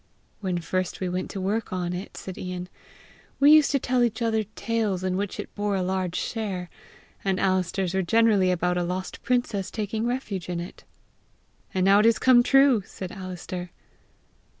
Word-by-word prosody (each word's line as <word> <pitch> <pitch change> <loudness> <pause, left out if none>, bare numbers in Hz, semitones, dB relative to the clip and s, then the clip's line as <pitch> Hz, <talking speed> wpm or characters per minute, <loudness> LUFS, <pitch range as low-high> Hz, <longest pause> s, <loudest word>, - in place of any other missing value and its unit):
"When 185 -3 -2
first 185 +2 -2
we 185 - -2
went 180 +1 -3
to 195 - -5
work 205 +4 -1
on 180 -1 -2
it," 185 +3 -7
said 190 - -7
Ian, 180 0 -5 0.7
"we 285 +1 +7
used 305 -1 +7
to 280 - +2
tell 255 -1 0
each 230 -2 0
other 220 -2 +1
tales 215 -5 -1
in 185 -1 0
which 200 +1 -3
it - - -6
bore 205 -1 -1
a 190 - 0
large 185 -1 -1
share, 195 -6 -3 0.5
and 190 -2 0
Alister's 185 -1 0
were 190 - +2
generally 210 -1 +3
about 180 0 +1
a - - 0
lost 185 +2 -4
princess 240 -6 0
taking 220 +1 -2
refuge 215 -8 -3
in 175 -1 -2
it!" 175 +2 -9 0.9
"And 185 -1 +1
now 200 +1 +6
it 215 - +5
is 230 - +4
come 255 -2 +6
true!" 270 -2 +5
said 185 0 -8
Alister. 185 -1 -6
190 Hz, 180 wpm, -26 LUFS, 180-225 Hz, 0.9 s, we